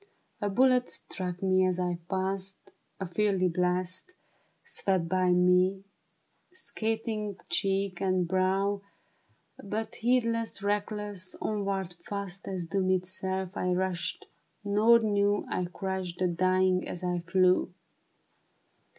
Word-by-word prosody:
A 205 - +1
bullet 250 +3 +4
struck 180 0 -5
me 185 0 +4
as 185 -1 +1
I 175 -1 -1
passed, 190 0 -3 0.3
A 190 - -2
fiery 185 0 +1
blast 180 - -1 0.5
Swept 185 -4 0
by 185 0 +2
me, 180 +2 +4 0.7
scathing 220 - -2
cheek 195 -2 0
and 185 -2 +1
brow, 190 +2 +1 0.8
But 215 +2 -4
heedless, 230 -3 +1
reckless, 205 -2 -2
onward, 195 -4 -2
fast 200 -1 -5
As 185 -3 -2
doom 185 +2 0
itself, 185 0 -1
I 180 0 0
rushed, 180 -1 -2 0.4
nor 210 +3 +5
knew 205 -2 +1
I 180 - 0
crushed 185 0 -4
the 185 - +2
dying 185 +1 +2
as 180 - -5
I 180 -1 0
flew. 180 +2 +3
190 Hz, 115 wpm, -29 LUFS, 180-205 Hz, 0.8 s, nor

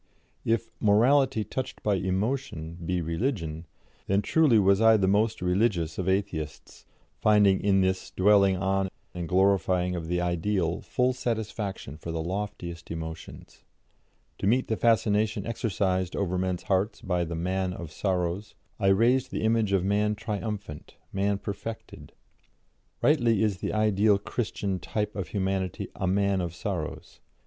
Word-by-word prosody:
If 115 0 0
"morality 120 +3 +4
touched 130 +5 -5
by 105 - +2
emotion" 95 - -2
be 90 +1 -1
religion, 85 - -2 0.4
then 100 +1 +2
truly 150 -5 +4
was 100 0 +4
I 110 0 +6
the 95 -2 +1
most 105 +1 +1
religious 90 -3 +1
of 95 0 0
Atheists, 85 -6 -3 0.3
finding 105 -3 +4
in 95 -1 +3
this 95 0 0
dwelling 100 -1 +4
on 95 0 0 0.2
and 85 -2 -5
glorifying 95 -1 +2
of 85 -2 -5
the 90 +1 0
Ideal 90 0 0
full 125 +1 0
satisfaction 110 - -4
for 85 - -6
the 80 - -3
loftiest 90 -1 -5
emotions. 80 -1 -8 0.8
To - - -1
meet 125 +5 +2
the 110 - +1
fascination 110 -2 +2
exercised 95 -5 -1
over 95 -2 -1
men's 90 -1 -1
hearts 95 +3 0
by 90 -3 0
the 85 0 -4
Man 95 +2 -1
of 85 -4 -7
Sorrows, 95 +3 -2 0.2
I 100 - +1
raised 120 +6 +3
the - - -3
image 110 -2 +2
of 95 -2 +2
man 105 +1 +1
triumphant, 105 -6 -5 0.2
man 100 +1 +1
perfected. 105 +3 -7 0.9
"Rightly 120 -8 +3
is 105 -4 +1
the - - -3
ideal 105 -1 +3
Christian 100 -2 -3
type 105 +4 -3
of 95 -5 -3
humanity 95 0 -2
a 95 - -2
Man 100 0 +2
of 85 -1 -4
Sorrows. 90 -5 -5
95 Hz, 145 wpm, -27 LUFS, 90-110 Hz, 0.9 s, I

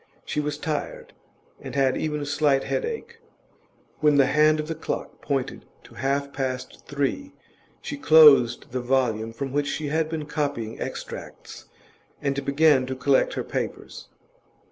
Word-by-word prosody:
She - - -2
was 150 0 -2
tired, 150 0 -4 0.5
and - - -8
had 135 -2 +2
even 150 -1 -2
a - - -3
slight 145 -1 +2
headache. 465 -1 -4 0.8
When 150 -2 +4
the 140 - +6
hand 155 +3 +3
of 155 - -3
the 165 - -2
clock 160 - -5
pointed 135 -3 -2 0.2
to - - -16
half 140 +4 -2
past 130 -2 -4
three, 145 - -2 0.5
she 285 - -5
closed 150 - +6
the 130 0 -2
volume 120 -3 0
from 135 +4 -5
which 145 0 0
she 150 0 -3
had 160 +1 0
been 160 -2 -4
copying 145 -7 -3
extracts, - - -7 0.5
and 140 -1 -2
began 140 -1 +3
to 130 - -3
collect 130 +1 +2
her - - -3
papers. - - -5
145 Hz, 150 wpm, -25 LUFS, 135-155 Hz, 0.8 s, the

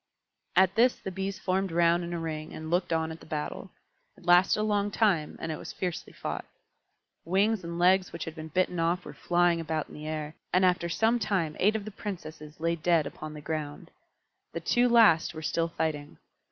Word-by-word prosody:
At 190 0 +5
this 245 +4 +4
the 190 - -7
Bees 195 +1 -3
formed 190 0 -1
round 170 +1 +3
in 170 - -5
a 170 - -2
ring 155 -2 -5
and 160 +1 -6
looked 175 0 +1
on 160 0 0
at 160 - -8
the - - -14
battle. 155 +4 -4 0.5
It 185 - -17
lasted 180 +3 +5
a - - +1
long 205 -1 +1
time, 195 -8 +1
and 160 - -3
it 155 - -5
was - - -8
fiercely 180 -3 -4
fought. - - -5 0.8
Wings 195 +4 +1
and 170 0 -5
legs 185 +1 +4
which 170 - -5
had 160 - -6
been 155 -1 -8
bitten 180 +2 0
off 170 +2 0
were - - -8
flying 175 -1 +2
about 160 -1 -3
in - - -13
the 150 +1 -8
air, 155 -1 -4 0.2
and 185 +1 +4
after 180 -1 +2
some 225 +7 +2
time 170 -8 0
eight 210 +3 +3
of 210 -2 -3
the 215 - -6
Princesses 160 -7 -8
lay 165 +1 +1
dead 165 -1 +2
upon 155 0 -7
the 150 - -8
ground. 150 -1 -5 0.6
The - - -3
two 245 0 +2
last 215 -9 +5
were 160 - -6
still 165 +2 0
fighting. 155 -3 -3
170 Hz, 210 wpm, -28 LUFS, 160-190 Hz, 0.8 s, At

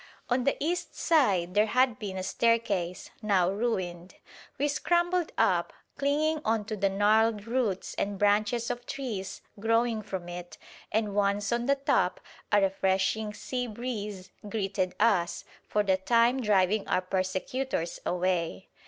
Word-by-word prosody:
On 250 0 +2
the 275 - +2
east 345 +4 -2
side 200 - +2
there 210 +2 +4
had 255 0 +2
been 195 -3 -5
a 185 - -3
staircase, 195 -4 0
now 190 -4 +2
ruined. 185 -5 -3 0.4
We 290 - +1
scrambled 345 +3 +1
up, - - +2 0.2
clinging 300 +2 +1
on 220 -1 0
to 215 0 -3
the 200 -1 +1
gnarled 210 +2 +3
roots 230 -5 -1
and 200 0 -1
branches 210 +4 +2
of 245 0 -6
trees 215 -9 -5 0.2
growing 230 +1 +1
from 190 -4 -6
it, 175 0 -8 0.3
and 215 -1 0
once 200 +1 +1
on 240 +1 0
the 280 - +4
top 275 0 +1 0.3
a 205 - +6
refreshing 195 +2 +1
sea 250 +1 -3
breeze 210 -5 -5 0.2
greeted 195 -3 -1
us, 200 -6 +2 0.2
for 210 - +1
the 190 -2 +2
time 235 +6 +3
driving 205 -1 +2
our 185 - +1
persecutors 185 +2 -2
away. 180 0 -1
210 Hz, 145 wpm, -28 LUFS, 190-240 Hz, 0.4 s, a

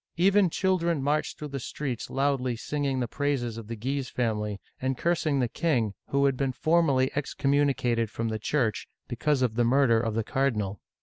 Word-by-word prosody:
Even 195 +1 +4
children 170 -5 +1
marched 150 +2 0
through 150 - -6
the 140 0 -4
streets 130 -1 -4
loudly 135 -3 0
singing 140 +2 -2
the 120 - -1
praises 135 -3 -1
of 115 -2 -8
the 115 - -4
Guise 130 +4 -3
family 105 -4 -1 0.2
and 130 0 -1
cursing 155 -4 +1
the 125 - +2
king, 120 - 0
who 140 0 +2
had 135 -1 +3
been 135 0 -1
formally 140 -1 +2
excommu 145 0 +1
nicated 120 -4 0
from 115 +1 -3
the 110 0 -3
Church 115 -1 0 0.2
because 130 +2 0
of 120 -3 +1
the 120 +2 +2
murder 120 -1 +4
of 115 -1 -2
the 115 - 0
car 135 +5 +1
dinal. 105 -4 -3
135 Hz, 190 wpm, -27 LUFS, 115-145 Hz, 0.2 s, Even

